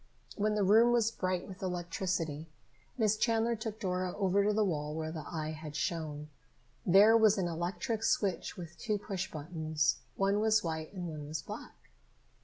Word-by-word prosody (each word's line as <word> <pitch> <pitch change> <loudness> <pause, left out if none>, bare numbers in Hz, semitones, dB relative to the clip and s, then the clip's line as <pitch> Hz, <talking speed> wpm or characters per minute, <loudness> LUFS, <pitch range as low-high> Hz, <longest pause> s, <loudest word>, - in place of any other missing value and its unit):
When 210 0 +1
the 210 - +2
room 225 +5 +6
was 230 -2 +3
bright 185 -4 -2
with 190 -1 -10
electricity, 175 -3 -2 0.5
Miss 215 -3 +3
Chandler 230 +1 +2
took 220 -1 -5
Dora 185 -3 -2
over 200 0 +2
to 210 - +3
the 210 0 +2
wall 150 -4 -2
where 160 0 -3
the 155 -3 -6
eye 155 -2 -3
had 155 -1 -8
shone. 155 -3 -3 0.5
There 200 +5 +7
was 220 -2 +5
an 185 -2 0
electric 175 +6 -2
switch 195 -6 0
with 170 -2 -9
two 215 -3 0
push 195 -2 -4
buttons. 155 -1 -1 0.2
One 195 +1 +2
was 215 0 +3
white 160 -2 -3
and 180 -3 -4
one 150 -3 -6
was 155 0 -4
black. - - -10
185 Hz, 175 wpm, -32 LUFS, 160-210 Hz, 0.5 s, There